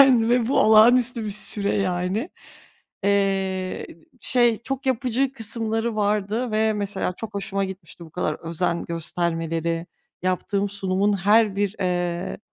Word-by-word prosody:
Aynen 250 -4 +6
ve 245 -1 +2
bu - - +2
olağanüstü 230 +2 +5
bir 210 - -3
süre, 200 0 +1
yani. 190 - -1 0.7
Eee, 195 -2 0 0.3
şey, 240 -2 +3
çok 270 +3 -5
yapıcı 260 +1 0
kısımları 225 -1 -2
vardı 210 +3 0
ve 220 0 +2
mesela 200 -3 -2
çok 210 +2 -8
hoşuma 195 0 -1
gitmişti 190 -2 -9
bu 160 - -14
kadar 155 -3 -2
özen 170 +1 -2
göstermeleri, 165 0 -2 0.4
yaptığım 195 +2 0
sunumun 200 0 0
her 205 +2 +3
bir, 205 0 0
eee, 175 -1 -2
200 Hz, 130 wpm, -23 LUFS, 185-225 Hz, 0.7 s, Aynen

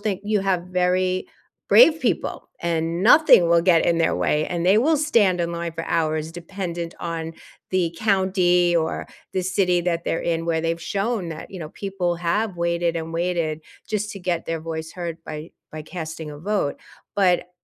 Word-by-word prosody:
think 205 -3 -2
you 210 -1 +1
have 190 -3 0
very 185 0 0 0.4
brave 325 -9 +7
people, - - -2
and 165 0 -1
nothing 230 - +7
will 170 0 +4
get 170 -3 +4
in 170 -1 +2
their 165 - +2
way, 150 +1 +1
and 175 -1 -2
they 190 +3 +5
will 310 +7 +3
stand 230 -12 +2
in 170 0 -1
line 170 0 -3
for 165 0 -5
hours, 155 -1 -1
dependent 175 -1 -5
on 165 -1 -4 0.4
the 175 -3 0
county, 185 -4 +2
or 160 -1 -1 0.3
the 185 - -1
city, 180 -1 +1
that 170 -1 -1
they're - - 0
in 165 -1 -1
where 165 -1 0
they've 165 0 -2
shown 200 -1 -2
that, 160 -1 -7
you 185 - -7
know, 155 - -6
people 185 -1 -3
have 180 +4 -1
waited 170 0 0
and 165 0 -5
waited 165 -2 -1 0.3
just 210 -1 -2
to 200 - -7
get 175 -2 -2
their 165 -1 -2
voice 160 0 -5
heard 170 -2 -5
by 155 +1 -7 0.2
by 155 0 -7
casting 160 -1 -7
a 145 - -9
vote. 195 -3 -1 0.3
But 180 -2 +2
175 Hz, 185 wpm, -23 LUFS, 165-190 Hz, 0.4 s, brave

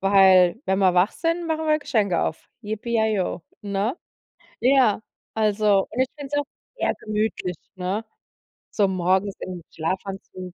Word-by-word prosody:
weil 190 +1 +5
wenn 190 +1 +2
wir 190 -2 +4
wach 180 +4 +3
sind, 335 +1 -1
machen 320 0 -1
wir 305 0 +3
Geschenke 210 - +1
auf. 160 - -3
Yippee 215 +2 -5
yay 220 0 +2
yo, 185 -1 -1 0.2
ne? 205 - -1 0.6
Ja, 255 -5 +4 0.3
also 210 -2 +2
und 240 - -3
ich 260 - +2
finde 285 -2 -8
es - - +3
auch - - -4 0.3
eher - - +1
gemütlich, 210 -5 -2 0.2
ne? 190 +4 -2 0.7
So 205 -2 +2
morgens 190 +2 +1
im 180 -2 -6
Schlafanzug. 185 +1 -5
200 Hz, 155 wpm, -24 LUFS, 185-230 Hz, 0.7 s, weil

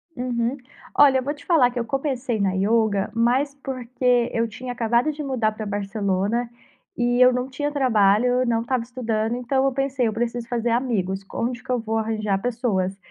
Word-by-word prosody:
Uhum. 245 0 -1 0.4
Olha, 275 -2 +7
eu - - -4
vou 285 +3 -2
te 290 -1 -16
falar 285 -8 +4
que 245 - -4
eu 235 - -2
comecei 260 -3 -2
na 195 -2 +1
yoga 205 0 +1
mais 250 +5 +1
porque 250 -2 0
eu 230 0 +1
tinha 250 +3 -7
acabado 240 +4 +1
de 300 0 -7
mudar 250 -6 0
pra 215 0 -6
Barcelona 205 +2 -1 0.5
e 245 0 +1
eu 250 0 +7
não 250 +1 -2
tinha 290 +2 -3
trabalho, 245 -2 +3
não 230 -1 +1
estava 245 0 -1
estudando, 230 -2 -2
então 265 +2 0
eu 270 - +2
pensei: 270 -2 0
"Eu 220 - -1
preciso 235 +1 -3
fazer 235 0 -1
amigos. 210 -6 -1
Com 195 - -4
onde 245 0 -3
que 265 - -21
eu 250 - +1
vou 225 0 -2
arranjar 215 -3 -1
pessoas?". 205 -6 -1
240 Hz, 190 wpm, -23 LUFS, 220-255 Hz, 0.5 s, Olha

